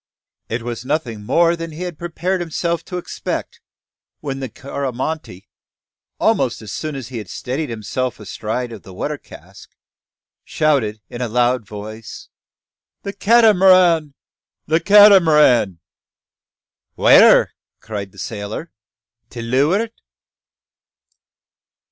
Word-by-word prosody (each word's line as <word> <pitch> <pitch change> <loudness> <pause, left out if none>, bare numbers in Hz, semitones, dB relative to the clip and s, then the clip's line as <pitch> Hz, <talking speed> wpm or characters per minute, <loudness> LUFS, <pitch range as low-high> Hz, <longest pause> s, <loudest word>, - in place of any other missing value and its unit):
It 115 +1 -3
was 120 0 -5
nothing 125 -7 -3
more 170 +9 +2
than 165 0 -6
he 165 +4 -6
had 175 -4 -6
prepared 175 +2 -2
himself 170 0 -2
to 180 - -5
expect, 180 - -5 0.6
when 135 -2 -5
the 130 -2 -5
Coromantee, 135 - -5 0.7
almost - - +1
as 105 - -8
soon 155 +4 -4
as 130 -4 -7
he 125 -3 -5
had 105 -4 -9
steadied 140 +4 -4
himself 115 +2 -4
astride 110 +3 -4
of 110 -3 -9
the 95 -4 -13
water - - -4
cask, - - -15 0.7
shouted, 130 -9 0
in 120 - -8
a 125 - -1
loud 120 -1 +1
voice 110 +1 -9 0.7
"The 200 - -5
Cat'maran! 185 -9 +4 0.5
the 160 +1 +2
Cat'maran!" 165 - +6 1.2
"Where?" - - +6 0.3
cried 100 -3 -6
the 95 - -21
sailor. 105 - -6 0.6
"To 120 -1 -7
leuart?" 150 - +1
135 Hz, 115 wpm, -19 LUFS, 115-170 Hz, 1.2 s, Cat'maran